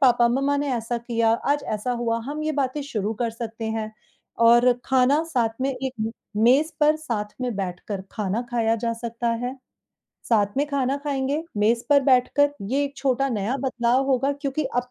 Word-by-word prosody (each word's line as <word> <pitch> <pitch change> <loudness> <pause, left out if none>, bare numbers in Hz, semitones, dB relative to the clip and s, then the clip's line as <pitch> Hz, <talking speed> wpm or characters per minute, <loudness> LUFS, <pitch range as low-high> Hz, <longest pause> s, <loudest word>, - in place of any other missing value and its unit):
पापा, 245 -3 +5
मम्मा 275 +4 +1
ने 285 0 -1
ऐसा 235 +1 -2
किया, 230 -1 +1
आज 285 +5 +1
ऐसा 215 +4 -2
हुआ," 235 -1 -1
हम 300 +2 -4
ये 310 0 -1
बातें 280 0 -1
शुरू 220 -6 -2
कर 230 +1 -1
सकते 225 0 -6
हैं। 220 -1 -3 0.5
और 240 +2 +6
खाना 265 +3 +3
साथ 255 -9 +1
में 270 +1 +1
एक 265 0 -4
म 220 +1 -1 0.3
मेज़ 275 +7 +4
पर 300 +1 +5
साथ 220 -9 -4
में 250 -2 -2
बैठकर 190 +1 -4
खाना 210 0 -1
खाया 230 -2 +2
जा 230 +1 -1
सकता 235 +1 -3 0.2
है, 250 +1 -3 0.7
साथ 205 -2 +2
में 285 +2 +2
खाना 275 -1 0
खाएँगे, 280 +1 -1
मेज 225 +3 +2
पर 285 -1 +7
बैठकर 275 +2 +3 0.2
ये 275 +2 +2
एक 280 0 -6
छोटा 270 0 +1
नया 225 +1 -1
बदलाव 250 0 +1
होगा 270 +1 +2
क्योंकि 285 +1 -3
अब 245 0 -1
250 Hz, 185 wpm, -24 LUFS, 230-275 Hz, 0.7 s, पर